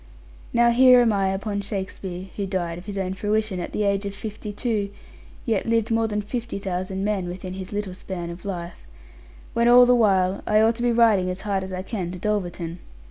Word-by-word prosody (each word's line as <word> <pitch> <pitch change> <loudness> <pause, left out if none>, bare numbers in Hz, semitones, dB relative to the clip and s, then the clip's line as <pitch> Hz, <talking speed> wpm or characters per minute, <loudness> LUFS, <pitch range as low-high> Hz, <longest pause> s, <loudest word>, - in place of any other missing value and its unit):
Now 235 0 +4
here 250 +1 +7
am 235 -3 +4
I 195 -1 +1
upon 200 +1 -2
Shakespeare 190 -2 -5
(who 200 -2 -2
died, 175 -3 -2
of 180 - -14
his 200 -1 -5
own 190 -1 -1
fruition, 210 0 -1
at 175 - -5
the 210 - -1
age 200 0 +1
of 200 - -6
fifty 210 0 -6
two, 205 -1 -1 0.6
yet 225 -5 0
lived 230 -1 +1
more 225 0 +2
than 210 -1 -2
fifty 235 +1 -4
thousand 190 0 -3
men, 200 -3 -1
within 180 +1 -6
his 190 -1 -7
little 205 -2 -3
span 180 -2 -6
of 170 +1 -10
life), 175 - -6 0.7
when 235 0 +2
all 245 +1 +8
the 250 - +5
while 195 -5 +3
I 215 0 +4
ought 220 +1 +4
to - - -4
be 240 0 +2
riding 220 -6 +4
as 180 +1 -4
hard 200 -2 -1
as 190 - -7
I 185 0 -4
can 190 -4 -4
to - - -6
Dulverton. 175 -4 -2
200 Hz, 215 wpm, -24 LUFS, 185-220 Hz, 0.7 s, all